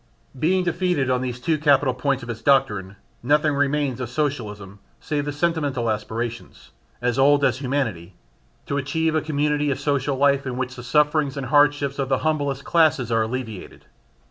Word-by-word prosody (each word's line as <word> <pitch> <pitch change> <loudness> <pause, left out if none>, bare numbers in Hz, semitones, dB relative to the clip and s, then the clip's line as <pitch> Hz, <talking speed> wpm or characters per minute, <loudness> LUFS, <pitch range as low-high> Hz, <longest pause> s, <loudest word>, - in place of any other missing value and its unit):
Being 185 +5 +2
defeated 175 -6 0
on 125 0 +1
these 125 -1 -4
two 155 +4 0
capital 140 -3 +3
points 135 0 -1
of 120 - -9
its 115 -1 -8
doctrine, 115 -8 +1 0.3
nothing 150 +4 +2
remains 140 -2 0
of 120 - -4
Socialism 105 -9 -4 0.2
save 145 -1 -2
the 145 - -2
sentimental 145 -6 -1
aspiration 115 +2 -4 0.5
as 125 +1 0
old 140 +1 +4
as 130 -2 +1
humanity 115 - -3 0.5
to 140 - -2
achieve 160 +3 0
a 155 - +1
community 150 -1 0
of 135 - -1
social 140 -1 0
life 140 0 +2
in 125 -1 -4
which 130 0 -3
the 120 - -8
sufferings 150 +3 +1
and 135 - -3
hardships 145 +1 +2
of 135 -1 -1
the 135 - +2
humblest 145 -3 -1
classes 155 -8 +2
are 115 -1 +2
alleviated. 110 -3 -5
140 Hz, 170 wpm, -23 LUFS, 125-145 Hz, 0.5 s, old